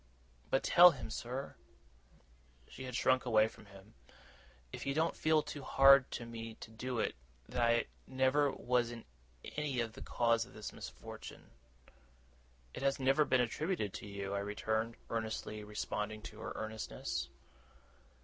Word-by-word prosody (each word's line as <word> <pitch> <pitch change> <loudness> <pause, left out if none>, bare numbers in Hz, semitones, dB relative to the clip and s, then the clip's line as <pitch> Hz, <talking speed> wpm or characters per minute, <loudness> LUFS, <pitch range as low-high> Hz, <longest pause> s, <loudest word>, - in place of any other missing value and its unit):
But 135 - +2
tell 180 +1 +9
him, 125 -9 -6
sir,' 125 +4 -4 1.1
she 130 - -9
had 125 -2 -5
shrunk 130 +1 +3
away 110 -3 +4
from 110 - -14
him, 100 +1 -15 0.8
'if - - -6
you 140 - 0
don't 160 +2 +1
feel 155 -1 +3
too 145 - -6
hard 135 0 +6
to 120 - -4
me 115 -1 -7
to 110 - -11
do 125 +2 -4
it, - - 0 0.3
that 125 - -2
I 115 0 +3 0.2
never 130 +2 +3
was 125 -2 +1
in 120 -1 -8 0.4
any 150 -4 -2
way 115 - +2
the 110 0 -11
cause 115 -1 +2
of 125 +2 -15
his 105 -1 -6
misfortune.' - - -9 1.2
'It - - -6
has 135 0 +1
never 135 +3 +4
been 130 -3 +3
attributed 125 - -1
to - - -7
you,' 100 -1 -4
I 100 - 0
returned, 110 +3 -1 0.2
earnestly 110 -1 -3
responding 105 +1 -4
to - - -9
her - - -5
earnestness. 110 -1 -4
120 Hz, 155 wpm, -35 LUFS, 110-135 Hz, 1.2 s, tell